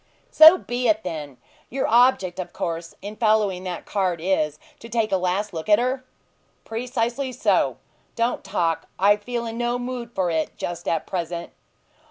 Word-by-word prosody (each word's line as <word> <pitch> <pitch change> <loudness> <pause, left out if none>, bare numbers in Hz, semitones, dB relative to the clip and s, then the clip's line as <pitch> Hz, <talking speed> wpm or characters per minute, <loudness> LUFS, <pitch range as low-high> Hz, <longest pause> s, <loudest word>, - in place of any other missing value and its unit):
"So 320 +3 +9
be 245 -5 -2
it, 215 0 +2
then! 150 -6 -6 0.3
Your 270 +2 -1
object, 230 -7 +3
of 185 - -5
course, 165 -1 -4
in 210 +1 -7
following 210 -5 +2
that 180 -2 -5
cart 185 -4 -1
is, 155 -4 0 0.2
to 230 - -11
take 225 -2 0
a - - +3
last 185 +3 -1
look 160 +4 -5
at 210 - +7
her?" 255 +2 -1 0.6
"Precisely 245 +3 -2
so. - - +1 0.4
Don't 235 +1 0
talk; 165 -1 -1
I 200 +2 +5
feel 235 +3 -4
in 230 +1 -5
no 240 0 0
mood 245 -1 -5
for 185 -3 0
it 160 -1 -2
just 175 0 -5
at 165 - 0
present." 170 -2 -4
205 Hz, 170 wpm, -23 LUFS, 175-240 Hz, 0.6 s, So